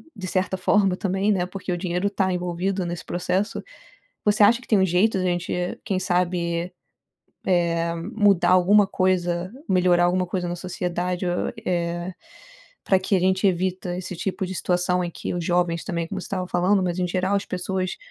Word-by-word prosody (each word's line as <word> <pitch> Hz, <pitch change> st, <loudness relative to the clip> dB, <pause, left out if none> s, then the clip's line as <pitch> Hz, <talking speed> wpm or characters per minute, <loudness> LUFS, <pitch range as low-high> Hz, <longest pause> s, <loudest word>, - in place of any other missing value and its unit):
de 190 Hz, -4 st, -6 dB
certa 185 Hz, 0 st, 0 dB
forma 190 Hz, 0 st, +2 dB
também, 195 Hz, +2 st, 0 dB
né, 185 Hz, -3 st, +1 dB
porque 185 Hz, 0 st, -6 dB
o 175 Hz, -, 0 dB
dinheiro 180 Hz, +2 st, -1 dB
tá 190 Hz, -2 st, 0 dB
envolvido 180 Hz, +2 st, -2 dB
nesse 175 Hz, 0 st, -5 dB
processo. 180 Hz, +3 st, -1 dB, 0.6 s
Você 210 Hz, 0 st, +3 dB
acha 230 Hz, +4 st, +6 dB
que -, -, -15 dB
tem 215 Hz, -, +4 dB
um 190 Hz, -, +4 dB
jeito 190 Hz, +4 st, +2 dB
da 185 Hz, -, -1 dB
gente, 175 Hz, 0 st, -1 dB, 0.3 s
quem 195 Hz, -3 st, -1 dB
sabe, 175 Hz, -1 st, -1 dB, 1.1 s
eh, 170 Hz, 0 st, -1 dB
mudar 200 Hz, +1 st, +2 dB
alguma 195 Hz, +3 st, +5 dB
coisa, 180 Hz, -1 st, 0 dB, 0.2 s
melhorar 180 Hz, -2 st, +4 dB
alguma 180 Hz, +1 st, +1 dB
coisa 180 Hz, 0 st, -3 dB
na 175 Hz, -, -3 dB
sociedade 180 Hz, 0 st, -3 dB
o 175 Hz, 0 st, -1 dB
eh, 175 Hz, 0 st, -2 dB, 0.7 s
pra 190 Hz, -, +4 dB
que 190 Hz, +1 st, 0 dB
a -, -, +3 dB
gente 185 Hz, +2 st, +2 dB
evita 185 Hz, 0 st, -1 dB
esse 180 Hz, 0 st, -5 dB
tipo 190 Hz, +2 st, -2 dB
de 190 Hz, +1 st, -5 dB
situação 180 Hz, 0 st, +1 dB
em 175 Hz, -, -3 dB
que -, -, -5 dB
os 175 Hz, -1 st, -2 dB
jovens 175 Hz, -1 st, +1 dB
também, 170 Hz, -4 st, -3 dB
como 190 Hz, +2 st, -5 dB
você -, -, -8 dB
estava 185 Hz, -2 st, -3 dB
falando, 185 Hz, +3 st, +2 dB
mas 180 Hz, 0 st, -1 dB
em 180 Hz, -, +1 dB
geral, 185 Hz, +2 st, 0 dB
as 200 Hz, -, -1 dB
pessoas, 185 Hz, 0 st, -3 dB
180 Hz, 185 wpm, -24 LUFS, 175-190 Hz, 1.1 s, acha